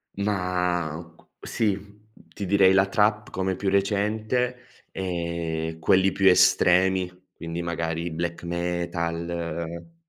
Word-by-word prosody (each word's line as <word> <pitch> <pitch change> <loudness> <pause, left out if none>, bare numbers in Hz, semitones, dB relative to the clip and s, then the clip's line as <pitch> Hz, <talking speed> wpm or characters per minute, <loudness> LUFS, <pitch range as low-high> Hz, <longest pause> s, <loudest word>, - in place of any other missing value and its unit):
Ma 90 -4 -1
cu - - -25 0.2
sì, 105 -4 0 0.5
ti 100 - -5
direi 95 0 +5
la 95 0 +4
trap, 105 +2 +1
come 95 0 -2
più 100 - -1
recente 110 +5 0 0.3
e 85 -3 -3
quelli 95 +4 +3
più 95 -1 +4
estremi, 90 0 +4 0.2
quindi 85 0 -6
magari 85 0 -3
black 85 +1 -4
metal 85 - -3
90 Hz, 105 wpm, -25 LUFS, 85-100 Hz, 0.5 s, direi